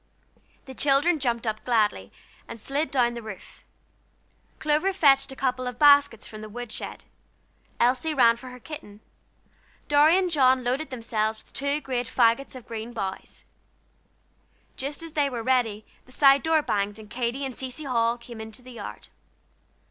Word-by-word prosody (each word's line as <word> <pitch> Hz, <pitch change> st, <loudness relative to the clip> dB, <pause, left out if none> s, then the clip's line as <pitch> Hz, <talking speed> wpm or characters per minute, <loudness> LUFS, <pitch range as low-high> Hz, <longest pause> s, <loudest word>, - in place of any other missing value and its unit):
The 265 Hz, -, -9 dB
children 290 Hz, +5 st, +2 dB
jumped 240 Hz, -3 st, -1 dB
up 215 Hz, -1 st, -3 dB
gladly, 210 Hz, -, +1 dB, 0.4 s
and 230 Hz, -, -8 dB
slid 285 Hz, +7 st, -2 dB
down 245 Hz, -3 st, +2 dB
the 235 Hz, -, -6 dB
roof. 215 Hz, -4 st, -11 dB, 0.9 s
Clover 310 Hz, +6 st, +1 dB
fetched 275 Hz, -8 st, +4 dB
a -, -, -8 dB
couple 255 Hz, -1 st, -1 dB
of 250 Hz, -1 st, -5 dB
baskets 285 Hz, -6 st, +5 dB
from 215 Hz, -1 st, -9 dB
the 215 Hz, -, -8 dB
wood 240 Hz, +1 st, -7 dB
shed. -, -, -7 dB, 0.7 s
Elsie 255 Hz, +6 st, +2 dB
ran 235 Hz, -3 st, +6 dB
for 255 Hz, +2 st, -11 dB
her 250 Hz, 0 st, -11 dB
kitten. 225 Hz, -8 st, -10 dB, 0.9 s
Dorry 295 Hz, +4 st, +5 dB
and 370 Hz, -2 st, 0 dB
John 260 Hz, -4 st, +4 dB
loaded 265 Hz, +5 st, -1 dB
themselves 220 Hz, -3 st, -2 dB
with -, -, -25 dB
two 280 Hz, +2 st, -1 dB
great 250 Hz, -3 st, -2 dB
fagots 240 Hz, +4 st, +2 dB
of 255 Hz, -, -11 dB
green 230 Hz, +1 st, -6 dB
boughs. 190 Hz, -3 st, -6 dB, 1.3 s
Just 285 Hz, +4 st, -5 dB
as 330 Hz, -2 st, -9 dB
they 290 Hz, -3 st, +2 dB
were 240 Hz, -3 st, -4 dB
ready, 225 Hz, -4 st, +1 dB, 0.2 s
the -, -, -17 dB
side 275 Hz, +1 st, +5 dB
door 320 Hz, -1 st, +2 dB
banged, 205 Hz, -2 st, -1 dB
and 215 Hz, -1 st, -12 dB
Katy 245 Hz, +4 st, -2 dB
and 265 Hz, -, -5 dB
Cecy 260 Hz, +4 st, -6 dB
Hall 235 Hz, -3 st, +1 dB
came 235 Hz, -1 st, -10 dB
into 220 Hz, +2 st, -10 dB
the 255 Hz, -, -12 dB
yard. 225 Hz, -4 st, -9 dB
250 Hz, 165 wpm, -26 LUFS, 230-280 Hz, 1.3 s, ran